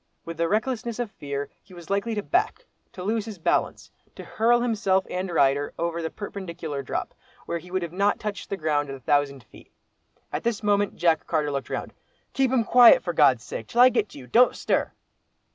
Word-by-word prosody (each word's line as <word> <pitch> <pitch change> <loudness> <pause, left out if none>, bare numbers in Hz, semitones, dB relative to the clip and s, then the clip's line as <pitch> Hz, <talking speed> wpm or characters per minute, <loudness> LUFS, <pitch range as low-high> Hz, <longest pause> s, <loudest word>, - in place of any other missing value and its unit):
With 165 -1 -7
the 170 - +1
recklessness 230 +1 -1
of 240 -4 -3
fear, 140 0 -5
he 185 - -17
was 175 +1 -10
likely 200 +3 0
to 210 - -2
back—to 360 - -3
lose 215 +2 -1
his 220 -3 -8
balance—to 165 - -3
hurl 240 +2 +2
himself 200 -5 +1
and 185 +1 -3
rider 145 -3 +1
over 170 0 -2
the 160 - -3
perpendicular 170 -8 -6
drop, 135 - -4 0.3
where 170 - -3
he 180 +2 -14
would 175 -2 -3
not 200 +2 +2
have - - -27
touched 205 -2 -5
ground 150 -3 0
at 135 - -5
a - - -11
thousand 140 0 0
feet. - - -18 0.6
At - - -3
this 230 -2 -1
moment 205 -1 +1
Jack 165 -2 +1
Carter 150 -3 0
looked 140 -1 -4
round. - - -4 0.4
"Keep 270 -2 +2
him 250 -2 +2
quiet, 245 - +7
for - - -3
God's - - +4
sake! - - -7
till 240 - +2
I 255 - +9
get 220 -4 0
to - - -13
you—don't 225 - +3
stir!" - - 0
190 Hz, 195 wpm, -25 LUFS, 160-225 Hz, 0.6 s, I